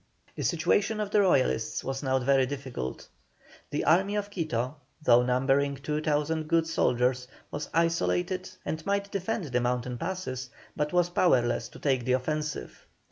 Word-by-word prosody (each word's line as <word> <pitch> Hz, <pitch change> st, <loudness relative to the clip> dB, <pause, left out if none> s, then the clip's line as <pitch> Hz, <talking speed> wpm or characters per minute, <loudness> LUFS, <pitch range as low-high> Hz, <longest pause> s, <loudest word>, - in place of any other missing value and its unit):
The -, -, -5 dB
situation 210 Hz, +1 st, +1 dB
of 210 Hz, -1 st, -2 dB
the 210 Hz, -, +5 dB
Royalists 130 Hz, -, +2 dB
was 135 Hz, 0 st, -3 dB
now 130 Hz, -2 st, +1 dB
very 130 Hz, 0 st, +3 dB
difficult. 130 Hz, -, -5 dB, 0.6 s
The -, -, -2 dB
Army 190 Hz, +5 st, +3 dB
of 205 Hz, 0 st, -2 dB
Quito, 145 Hz, -, -2 dB, 0.2 s
though 125 Hz, -5 st, +5 dB
numbering 135 Hz, +3 st, +2 dB
2,000 150 Hz, +2 st, -1 dB
good 165 Hz, 0 st, +3 dB
soldiers, 125 Hz, -5 st, +1 dB, 0.2 s
was 145 Hz, +1 st, -4 dB
isolated, 175 Hz, +2 st, 0 dB, 0.2 s
and 155 Hz, +1 st, -3 dB
might 200 Hz, +1 st, -1 dB
defend 200 Hz, +2 st, -2 dB
the 125 Hz, 0 st, +2 dB
mountain 125 Hz, 0 st, -1 dB
passes, 165 Hz, -8 st, -4 dB, 0.3 s
but 150 Hz, 0 st, -1 dB
was 175 Hz, -1 st, +2 dB
powerless 130 Hz, -, +2 dB
to -, -, -13 dB
take 130 Hz, -4 st, +1 dB
the 130 Hz, -, +2 dB
offensive. 150 Hz, -, -3 dB
150 Hz, 150 wpm, -28 LUFS, 130-175 Hz, 0.6 s, the